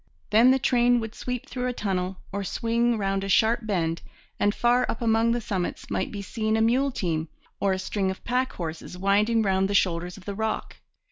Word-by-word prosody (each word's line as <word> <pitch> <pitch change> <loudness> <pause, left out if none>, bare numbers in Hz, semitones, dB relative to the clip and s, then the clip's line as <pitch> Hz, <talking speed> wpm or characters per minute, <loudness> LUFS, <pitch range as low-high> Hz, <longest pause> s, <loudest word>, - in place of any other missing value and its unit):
Then 225 +4 +6
the 260 - +5
train 245 -1 +3
would 225 -1 -5
sweep 250 0 -5
through 250 -1 -3
a 250 - -1
tunnel, 190 -4 -2
or 200 +1 -3
swing 230 +4 0
round 195 -1 -1
a 195 - -4
sharp 225 +2 +3
bend, 170 -5 -1 0.4
and 205 - +3
far 245 +1 +3
up 225 - -2
among 230 0 +2
the 240 - +1
summits 190 -4 -3
might - - -1
be 200 -1 -5
seen 220 +1 -1
a - - +2
mule 255 +5 +3
team, 165 -8 -2 0.3
or 200 - +2
a 190 - +1
string 190 +1 -1
of 190 - -6
pack 255 +2 0
horses 165 +1 -6
winding 210 +4 +2
round 190 -1 +1
the 200 - 0
shoulders 180 -1 +1
of 190 - -14
the 200 - -4
rock. 220 +2 -3
210 Hz, 210 wpm, -26 LUFS, 190-235 Hz, 0.4 s, Then